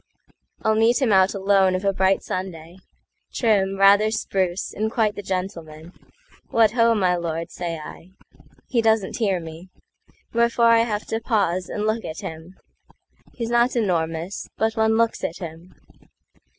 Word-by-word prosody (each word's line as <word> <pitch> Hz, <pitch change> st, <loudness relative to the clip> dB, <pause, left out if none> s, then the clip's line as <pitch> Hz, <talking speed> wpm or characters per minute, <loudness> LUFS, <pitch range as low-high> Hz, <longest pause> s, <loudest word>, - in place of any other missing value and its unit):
I'll 220 Hz, -, +3 dB
meet 225 Hz, +2 st, +3 dB
him 250 Hz, -7 st, +2 dB
out 190 Hz, +1 st, +4 dB
alone 195 Hz, -1 st, +3 dB
of 185 Hz, +2 st, -3 dB
a 195 Hz, -, +2 dB
bright 190 Hz, 0 st, +1 dB
Sunday, 175 Hz, -2 st, -6 dB, 0.6 s
Trim, 195 Hz, -4 st, +1 dB
rather 200 Hz, +2 st, +5 dB
spruce, 190 Hz, -4 st, -2 dB
and 215 Hz, +1 st, -2 dB
quite 220 Hz, -3 st, +1 dB
the 205 Hz, -, -7 dB
gentleman."What 185 Hz, -, -3 dB
ho, 230 Hz, 0 st, +3 dB
my 185 Hz, -4 st, +2 dB
lord!" 165 Hz, 0 st, -4 dB
say 170 Hz, -2 st, -4 dB
I. 160 Hz, +3 st, -11 dB, 0.6 s
He 240 Hz, -3 st, +1 dB
doesn't 220 Hz, -3 st, +1 dB
hear 200 Hz, -6 st, 0 dB
me; 165 Hz, +2 st, -10 dB, 0.6 s
Wherefore 235 Hz, 0 st, +3 dB
I 230 Hz, 0 st, +6 dB
have 210 Hz, -2 st, -3 dB
to 225 Hz, -, -3 dB
pause 195 Hz, -6 st, -1 dB
and 210 Hz, -, -3 dB
look 220 Hz, +1 st, -1 dB
at 160 Hz, -, -7 dB
him. 160 Hz, +3 st, -9 dB, 0.8 s
He's 230 Hz, -1 st, -4 dB
not 240 Hz, +2 st, +2 dB
enormous, 170 Hz, -4 st, -2 dB
but 220 Hz, 0 st, 0 dB
one 220 Hz, 0 st, +2 dB
looks 230 Hz, 0 st, 0 dB
at 170 Hz, -, -3 dB
him. 170 Hz, +1 st, -10 dB
195 Hz, 150 wpm, -23 LUFS, 180-225 Hz, 0.8 s, I